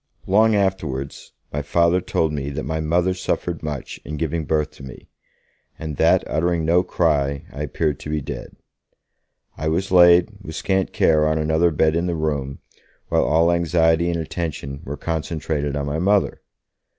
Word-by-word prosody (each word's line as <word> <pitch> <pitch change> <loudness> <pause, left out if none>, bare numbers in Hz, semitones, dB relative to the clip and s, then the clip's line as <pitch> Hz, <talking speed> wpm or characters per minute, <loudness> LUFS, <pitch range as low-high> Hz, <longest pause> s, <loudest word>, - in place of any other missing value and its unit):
Long 110 +3 +4
afterwards, 95 -9 -2 0.2
my 75 - -1
Father 85 +4 +2
told 80 -3 0
me 70 -1 -3
that 75 +2 -4
my 80 +2 -2
Mother 85 +4 +1
suffered 90 -2 -3
much 75 -4 -5
in 75 +1 -6
giving 80 +1 -2
birth 75 0 0
to - - -14
me, 65 -2 -11 0.7
and 80 -3 -6
that, - - +4
uttering 85 +1 0
no 85 +2 +4
cry, 70 -6 0
I 75 - -6
appeared 75 0 -1
to - - -8
be 75 0 0
dead. 70 - -7 1.0
I 80 - -2
was 90 +5 -1
laid, 85 +1 +6
with 80 -5 -8
scant 95 +2 0
care, 75 -1 +3
on 80 0 +1
another 80 +2 +2
bed 80 0 +2
in 85 +2 0
the 85 - -1
room, 70 -4 -3 0.5
while - - +2
all 85 +2 +3
anxiety 85 0 +2
and 85 -1 -1
attention 75 -4 -5
were 70 +2 -5
concentrated 80 -3 -2
on 70 -1 -2
my 75 +2 -2
Mother. 100 +3 +1
80 Hz, 170 wpm, -22 LUFS, 75-85 Hz, 1.0 s, laid